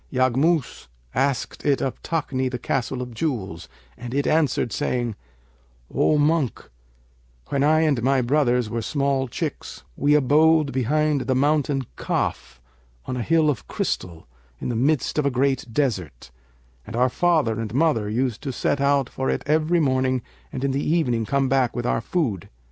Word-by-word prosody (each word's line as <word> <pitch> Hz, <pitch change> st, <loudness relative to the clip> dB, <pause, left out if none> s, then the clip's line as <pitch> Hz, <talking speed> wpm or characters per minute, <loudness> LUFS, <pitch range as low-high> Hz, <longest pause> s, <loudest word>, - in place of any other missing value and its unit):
Yaghmus 130 Hz, +4 st, +1 dB, 0.3 s
asked 135 Hz, 0 st, -1 dB
it 140 Hz, -2 st, +2 dB
of 135 Hz, -, -3 dB
Takni, 140 Hz, -5 st, -1 dB
the 125 Hz, -, -4 dB
Castle 125 Hz, +1 st, -2 dB
of 125 Hz, -1 st, -9 dB
Jewels, 110 Hz, -, -3 dB, 0.3 s
and 120 Hz, +2 st, -7 dB
it 140 Hz, -, +1 dB
answered, 150 Hz, -7 st, +1 dB
saying 120 Hz, -5 st, -1 dB, 0.8 s
'O 155 Hz, -, +3 dB
Monk, 150 Hz, -, 0 dB, 0.8 s
when 140 Hz, 0 st, +1 dB
I 155 Hz, +2 st, +4 dB
and 145 Hz, -6 st, +2 dB
my 130 Hz, +1 st, +2 dB
brothers 125 Hz, -3 st, +2 dB
were 115 Hz, +1 st, -3 dB
small 135 Hz, +2 st, 0 dB
chicks -, -, -5 dB
we 145 Hz, +2 st, +3 dB
abode 150 Hz, +1 st, +4 dB
behind 140 Hz, +1 st, +1 dB
the 130 Hz, -, +2 dB
Mountain 145 Hz, -1 st, +1 dB
Kaf -, -, -3 dB, 0.5 s
on 130 Hz, -, -3 dB
a 125 Hz, -, -2 dB
hill 160 Hz, +4 st, +2 dB
of 140 Hz, -7 st, -1 dB
crystal, 85 Hz, -3 st, -3 dB, 0.3 s
in -, -, -4 dB
the 120 Hz, -, -2 dB
midst 140 Hz, +5 st, +1 dB
of 150 Hz, -, +1 dB
a -, -, +4 dB
great 130 Hz, -2 st, 0 dB
desert; 95 Hz, -, -2 dB, 0.6 s
and -, -, -6 dB
our 125 Hz, +2 st, +3 dB
father 155 Hz, -8 st, +1 dB
and 115 Hz, -2 st, -4 dB
mother 125 Hz, -6 st, +1 dB
used 120 Hz, 0 st, -1 dB
to 135 Hz, -, -3 dB
set 140 Hz, +2 st, -1 dB
out 140 Hz, -2 st, +2 dB
for 130 Hz, +1 st, -3 dB
it -, -, -1 dB
every 155 Hz, +3 st, +2 dB
morning 130 Hz, -3 st, +1 dB, 0.3 s
and 130 Hz, -2 st, -5 dB
in 140 Hz, -, +1 dB
the 140 Hz, +2 st, -1 dB
evening 125 Hz, -9 st, +1 dB
come 140 Hz, -1 st, +1 dB
back 130 Hz, -2 st, +1 dB
with 120 Hz, -, -3 dB
our 115 Hz, -, +1 dB
food. 120 Hz, -, -2 dB
135 Hz, 165 wpm, -23 LUFS, 120-150 Hz, 0.8 s, I